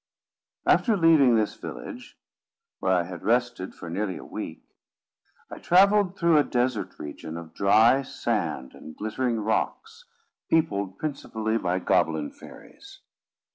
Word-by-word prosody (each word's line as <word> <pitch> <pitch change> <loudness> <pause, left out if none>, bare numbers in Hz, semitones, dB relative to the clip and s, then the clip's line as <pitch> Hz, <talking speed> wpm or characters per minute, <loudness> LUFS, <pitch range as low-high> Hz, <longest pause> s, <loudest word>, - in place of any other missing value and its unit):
After 225 -4 +3
leaving 160 -8 +5
this 110 -2 0
village, - - -9 0.6
where 95 - 0
I 90 -2 +3
had 85 -1 -8
rested 120 -3 0
for 90 - -9
nearly 95 +2 -3
a - - -10
week, - - -7 0.9
I - - -8
travelled 195 +1 +4
through 170 -3 +4
a - - +4
desert 125 -4 -1
region 80 +2 -7
of 85 -1 -10
dry 110 +7 +4
sand 65 - -3
and 80 - -12
glittering 115 +2 -2
rocks, 450 - -2 0.4
peopled 100 -12 0
principally 115 -7 -2
by 90 -2 0
goblin 80 -4 +1
fairies. - - -15
110 Hz, 130 wpm, -26 LUFS, 95-145 Hz, 0.9 s, leaving